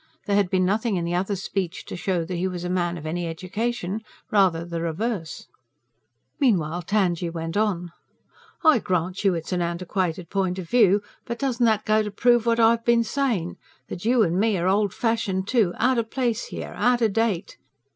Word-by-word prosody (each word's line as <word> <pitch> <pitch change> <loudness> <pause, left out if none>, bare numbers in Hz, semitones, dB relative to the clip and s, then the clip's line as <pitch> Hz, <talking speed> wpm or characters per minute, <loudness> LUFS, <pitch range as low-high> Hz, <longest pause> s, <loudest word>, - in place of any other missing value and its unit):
There 205 - +1
had 200 -3 +2
been 185 -1 +2
nothing 215 +3 +1
in 175 -2 -1
the 170 - -2
other's 190 +2 -1
speech 185 -3 -3
to - - -7
show 175 -2 -1
that 180 - -5
he 180 +2 0
was 180 -2 -5
a 180 - -3
man 175 -1 0
of 155 - -9
any 170 +2 -2
education 200 +4 -3 0.3
rather 185 -5 +3
the 170 -1 -4
reverse. 170 +1 -3 0.9
Meanwhile 175 - +1
Tangye 180 -5 +1
went 165 0 -5
on: 190 -5 0 0.7
"I 315 -6 +6
grant 180 -1 -2
you 195 -3 +3
it's 165 +2 -5
an 180 -1 0
antiquated 175 0 -2
point 190 -2 0
o' 185 - -4
view; 200 +1 +3 0.2
but 235 -1 -4
doesn't 250 -3 +1
that 215 -2 +1
go 215 0 +3
to 210 - -3
prove 240 +3 +2
what 230 0 +2
I've 230 0 +4
been 235 0 +3
sayin'; 230 -9 -1 0.3
that 175 - -6
you 235 +1 +4
and 175 -1 0
me 215 -1 +2
are 175 +1 0
old 200 +1 +2
fashioned, 210 -5 -1
too 225 -8 +2
out 255 +1 +2
o' - - +1
place 235 0 -2
here, - - -7
out 245 -1 +2
o' - - +5
date? 215 -4 -1
195 Hz, 195 wpm, -24 LUFS, 175-225 Hz, 0.9 s, I